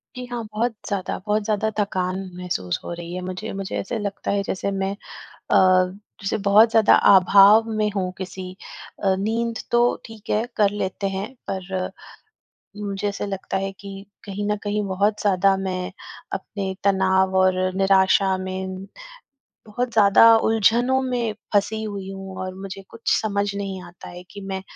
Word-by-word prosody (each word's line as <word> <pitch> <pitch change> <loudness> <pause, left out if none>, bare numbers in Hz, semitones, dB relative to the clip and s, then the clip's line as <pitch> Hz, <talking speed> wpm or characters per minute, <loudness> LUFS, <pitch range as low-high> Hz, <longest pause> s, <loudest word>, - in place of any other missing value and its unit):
जी 250 0 -6
हाँ, 235 -2 -3
बहुत 235 +3 0 0.2
ज़्यादा 195 -3 -2
बहुत 210 0 +1
ज़्यादा 215 +1 0
थकान 185 -2 -1 0.2
महसूस 95 - -3
हो - - -6
रही 170 0 -7
है 185 - -4
मुझे, 185 +4 -5
मुझे 195 -1 -5
ऐसे 230 +4 -3
लगता 200 -1 -3
है 200 0 0
जैसे 195 +1 -2
मैं 195 0 -1 0.4
अ, - - -1 0.6
जैसे 200 +2 -1
बहुत 215 +3 +7
ज़्यादा 225 -2 +6 0.2
अभाव 200 +4 +6
में 215 -1 0
हूँ 185 -2 -1
किसी 185 0 -6 0.5
अ, 190 -1 +3
नींद 230 +3 -1
तो 240 - +4 0.3
ठीक 225 -2 -13
है 215 +2 +1
कर 205 -2 +4
लेते 200 -1 -3
हैं 195 +2 -3 0.2
पर, 190 -1 -3 0.9
मुझे 205 -1 -3
ऐसे 200 - -4
लगता 195 -1 -3
है 195 0 -2
कि 195 0 -9 0.2
कहीं 205 0 -4
न 210 - +2
कहीं 210 0 -1
बहुत 205 +3 0
ज़्यादा 195 -1 +3
मैं 185 -1 -3 0.4
अपने 195 -2 -4
तनाव 190 -1 +2
और 185 0 +4 0.2
निराशा 190 0 +3
में, 185 0 -5 0.8
बहुत 240 +3 -3
ज़्यादा 220 +2 +7
उलझनों 225 +4 +3
में 245 -3 -1 0.2
फंसी 220 +1 +1
हुई 200 -3 -5
हूँ 195 -1 -8
और 185 0 -5
मुझे 195 0 -8
कुछ 230 - -13 0.2
समझ 205 -1 -1
नहीं 195 -2 -4
आता 175 0 -12
है 175 0 -10
कि 205 - -9
मैं 195 -1 -5
195 Hz, 160 wpm, -23 LUFS, 190-210 Hz, 0.9 s, बहुत